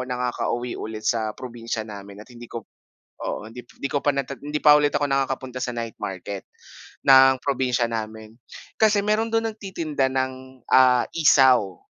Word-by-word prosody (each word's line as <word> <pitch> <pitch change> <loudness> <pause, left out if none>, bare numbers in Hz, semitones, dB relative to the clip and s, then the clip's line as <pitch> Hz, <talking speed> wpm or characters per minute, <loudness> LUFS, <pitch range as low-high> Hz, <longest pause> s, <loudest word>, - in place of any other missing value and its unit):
nakakauwi 125 -1 -2
ulit 110 0 -7
sa 110 -3 -1
probinsya 115 -3 -5
namin 100 -1 -10
at - - -24
hindi 120 0 -12
ko, 115 -3 -7 0.6
oo, - - -4
hindi 120 +2 -9 0.2
hindi 140 - -4
ko 145 - +1
pa 145 -1 +1
na 140 - 0 0.2
hindi 150 +1 -4
pa 150 - +9
ulit 145 -1 +1
ako 145 - +1
nakakapunta 130 -2 -2
sa 125 -2 -3
night 115 -2 -4
market 95 +1 -6 0.6
ng 135 -1 +7
probinsya 130 -3 0
namin. 110 -1 -6 0.5
Kasi 210 -2 +3
meron 215 +2 +1
dun 225 0 +2
nagtitinda 170 -10 -2
ng, 130 -1 -4
ah, 125 -1 +6
isaw 130 - +4
130 Hz, 160 wpm, -23 LUFS, 115-140 Hz, 0.6 s, pa